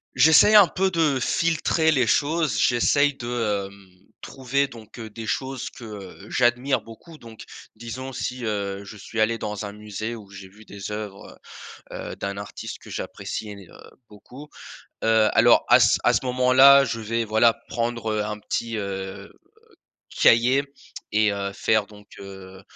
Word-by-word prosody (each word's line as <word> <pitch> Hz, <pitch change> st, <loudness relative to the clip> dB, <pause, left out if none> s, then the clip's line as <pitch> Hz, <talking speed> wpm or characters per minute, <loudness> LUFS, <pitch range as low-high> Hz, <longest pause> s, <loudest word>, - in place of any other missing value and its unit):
j'essaye 160 Hz, +10 st, +6 dB
un 205 Hz, -3 st, +8 dB
peu 190 Hz, +4 st, 0 dB
de 160 Hz, -6 st, +1 dB
filtrer 160 Hz, +3 st, +1 dB
les 130 Hz, -6 st, +2 dB
choses, 150 Hz, -4 st, +1 dB
j'essaye 140 Hz, +5 st, +3 dB
de, 115 Hz, -5 st, -2 dB
hem, 100 Hz, -1 st, -18 dB, 0.3 s
trouver 135 Hz, +1 st, -2 dB
donc, 115 Hz, -3 st, -14 dB
heu, 110 Hz, -2 st, -8 dB
des 110 Hz, +1 st, -8 dB
choses 130 Hz, +4 st, -3 dB
que, -, -, -14 dB
heu, 100 Hz, -2 st, -10 dB
j'admire 125 Hz, +2 st, +1 dB
beaucoup. 135 Hz, +9 st, -14 dB
Donc, 115 Hz, -2 st, -12 dB, 0.3 s
disons 125 Hz, +4 st, -7 dB
si, 125 Hz, 0 st, -5 dB
heu, 100 Hz, -2 st, -3 dB
je 100 Hz, +2 st, -11 dB
suis 110 Hz, +3 st, -7 dB
allé 115 Hz, +1 st, +1 dB
dans 105 Hz, -1 st, -5 dB
un 100 Hz, -, -7 dB
musée 105 Hz, +2 st, -6 dB
où 105 Hz, -4 st, -13 dB
j'ai 95 Hz, 0 st, -11 dB
vu 105 Hz, +3 st, -18 dB
des 100 Hz, 0 st, -8 dB
oeuvres, 105 Hz, -2 st, -8 dB, 0.5 s
heu -, -, -7 dB, 0.2 s
heu, -, -, -9 dB
d'un 100 Hz, 0 st, -5 dB
artiste 100 Hz, 0 st, -8 dB
que -, -, -15 dB
j'apprécie 110 Hz, -, -6 dB
én 100 Hz, -, -9 dB
heu, -, -, -16 dB, 0.2 s
beaucoup, 125 Hz, +8 st, -14 dB, 0.6 s
heu, 110 Hz, -1 st, +3 dB
alors -, -, +5 dB
à -, -, +7 dB
c -, -, +4 dB
à -, -, +4 dB
ce -, -, 0 dB
moment-là, 130 Hz, +2 st, +6 dB
je 115 Hz, -3 st, -3 dB
vais, 115 Hz, +1 st, -2 dB
voilà, 110 Hz, +2 st, +3 dB, 0.2 s
prendre, 115 Hz, -1 st, -2 dB
heu, 105 Hz, -1 st, -1 dB
un 105 Hz, 0 st, -4 dB
petit, 115 Hz, +2 st, -3 dB
heu, 95 Hz, -1 st, -6 dB, 0.8 s
cahier 125 Hz, +4 st, +4 dB, 0.5 s
et 110 Hz, 0 st, +3 dB
heu, 100 Hz, -1 st, -4 dB
faire 110 Hz, +1 st, +1 dB
donc 105 Hz, -1 st, -17 dB
heu 95 Hz, -1 st, -11 dB
115 Hz, 170 wpm, -23 LUFS, 105-130 Hz, 0.8 s, un